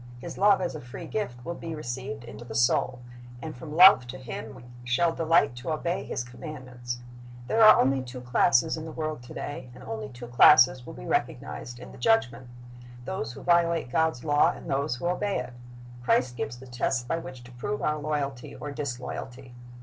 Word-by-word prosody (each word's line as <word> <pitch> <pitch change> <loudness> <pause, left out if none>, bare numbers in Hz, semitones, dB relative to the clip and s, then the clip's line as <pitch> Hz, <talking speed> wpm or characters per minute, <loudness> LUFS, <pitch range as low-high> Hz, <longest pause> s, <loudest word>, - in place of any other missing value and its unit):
His 165 +7 -8
love 200 -1 +4
as 180 - -2
a 155 - -7
free 120 0 -9
gift 120 - -4
will 170 - -3
be 165 -1 -6
received 135 -1 -5
into 115 -1 -10
the 115 -2 -8
soul, 120 +1 +2 0.4
and 155 +3 -7
from 150 +4 -8
love 180 -7 +8
to 125 +2 -7
Him 125 -3 -7
we - - -12 0.2
shall 165 +8 +2
delight 165 -6 +3
to 120 +6 -6
obey 170 +3 -1
His 120 - -3
commandments. 125 -2 -7 0.4
There 225 - +1
are 215 - +9
only 135 +1 +3
two 125 0 -8
classes 125 +4 +3
in 160 - -6
the 160 - -7
world 155 -4 -4
to 120 - -12
day, 130 -3 -6
and - - -12
only 110 -1 -5
two 125 +1 -9
classes 125 +1 +6
will - - -8
be - - -9
recognized 120 - -2
in 120 - -11
the - - -13
Judgment, 130 - +2 0.3
— 120 0 -15
those 125 -10 -4
who - - -10
violate 170 -5 +2
God's 160 -5 +1
law, 145 -1 +4
and - - -7
those 140 -1 0
who 125 - -6
obey 195 +3 0
it. 125 0 -5 0.5
Christ 125 0 +2
gives 120 0 -4
the 130 - -12
test 125 0 -1
by 165 - -1
which 130 -6 -9
to 125 - -13
prove 125 +13 -4
our 150 0 0
loyalty 145 -4 -3
or 145 - -6
disloyalty. 130 -2 -6
130 Hz, 205 wpm, -27 LUFS, 120-160 Hz, 0.5 s, are